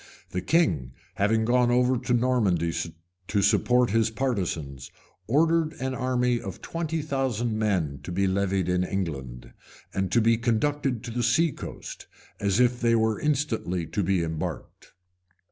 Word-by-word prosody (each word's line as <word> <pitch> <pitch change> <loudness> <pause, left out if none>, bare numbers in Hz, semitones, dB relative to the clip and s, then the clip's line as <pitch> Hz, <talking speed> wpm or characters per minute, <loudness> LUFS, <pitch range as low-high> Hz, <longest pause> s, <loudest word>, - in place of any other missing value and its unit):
The 90 - -2
king, 85 - +1 0.2
having 110 +2 +1
gone 120 +1 +3
over 125 +1 +3
to 125 0 -1
Normandy 110 -9 +1 0.5
to 100 - +1
support 120 +3 +3
his 115 0 +2
partisans, 90 - -3 0.4
ordered 160 +5 +2
an 130 +1 -2
army 125 -1 0
of 95 -3 -7
twenty 165 -2 -3
thousand 130 -6 -1
men 90 -10 0
to - - -7
be 95 +3 +1
levied 95 -1 0
in 90 0 +1
England, 70 -11 -4 0.4
and 95 -1 -1
to 120 - +4
be 115 0 +3
conducted 125 +1 0
to 120 - -6
the 120 +1 -2
sea 145 +8 +3
coast, - - -8 0.3
as 100 +2 +1
if 125 0 +3
they 115 -1 +3
were 110 -2 +1
instantly 125 - -1
to 105 - -2
be 95 -2 +1
embarked. 80 -1 -6
115 Hz, 150 wpm, -26 LUFS, 95-125 Hz, 0.5 s, to